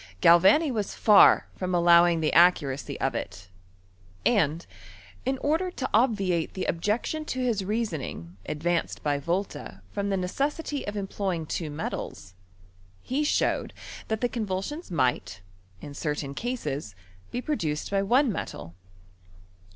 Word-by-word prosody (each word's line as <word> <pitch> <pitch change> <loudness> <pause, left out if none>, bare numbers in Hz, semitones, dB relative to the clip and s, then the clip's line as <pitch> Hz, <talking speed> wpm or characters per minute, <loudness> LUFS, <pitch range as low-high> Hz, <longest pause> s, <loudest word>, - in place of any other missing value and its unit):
Galvani 190 - +6
was 210 -4 -3
far 210 -2 +6
from 185 -1 -2
allowing 170 -1 +5
the 155 - 0
accuracy 145 -5 +3
of 135 - 0
it; 90 -4 -6 0.8
and, 170 -7 +2 0.6
in 265 0 +1
order 320 +7 0
to 325 - -4
obviate 200 -8 +1
the 190 - -2
objection 210 - -1
to 260 -4 -4
his 235 -6 0
reasoning 170 - -4
advanced 170 +2 -2
by 145 -1 0
Volta 150 - -4
from 200 0 -2
the 195 - +1
neces 195 +11 -1
sity 295 -3 -4
of 205 0 -4
employing 190 -4 -3
two 155 +1 -3
metals, 145 - -6 0.7
he 275 +4 -1
showed 295 - 0 0.3
that 220 -1 -2
the 245 - +2
convulsions 225 - -4
might, 125 - -1 0.4
in 145 - -8
certain 145 -1 -3
cases, 150 - -4 0.3
be 245 - -3
produced 165 - -2
by 195 -1 +2
one 245 +6 +3
metal. 85 - -6
185 Hz, 135 wpm, -27 LUFS, 155-235 Hz, 0.8 s, Galvani